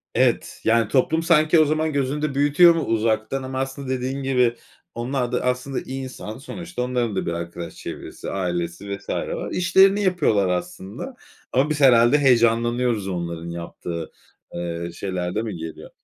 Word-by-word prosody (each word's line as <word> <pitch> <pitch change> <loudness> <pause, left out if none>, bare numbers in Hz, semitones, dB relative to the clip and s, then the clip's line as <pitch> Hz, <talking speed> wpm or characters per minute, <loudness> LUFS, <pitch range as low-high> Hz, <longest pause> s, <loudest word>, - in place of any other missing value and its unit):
Evet, - - +1
yani, 115 -1 +3
toplum 160 +6 +2
sanki 160 -1 +4
o 155 - +6
zaman 155 +1 0
gözünde 140 +1 -1
büyütüyor 145 +5 +6
mu 165 - -1
uzaktan 115 +3 0
ama 130 0 -4
aslında 135 0 -4
dediğin 130 +1 -2
gibi 125 -3 +2 0.4
onlar 125 +1 -2
da 125 - 0
aslında 125 +2 -1
insan 130 -4 -6
sonuçta 170 +2 -6
onların 125 -4 -1
da - - -1
bir 85 - -2
arkadaş 85 0 -6
çevresi - - -7
ailesi 90 +2 -3
vs. 100 - -16
var. - - -3
İşlerini 195 +3 +4
yapıyorlar 145 - +2
aslında 95 - -4 0.4
ama 135 +4 +2
biz 150 -1 -1
herhâlde 120 +1 +6
heyecanlanıyoruz 120 -4 +2
onların 85 -2 -4
yaptığı, 85 -1 -6 0.4
ııı, 85 0 -4
şeyler 90 0 -3
de 110 - +1
mi 110 -4 -4
geliyor? 80 -1 -8
125 Hz, 155 wpm, -23 LUFS, 95-140 Hz, 0.4 s, o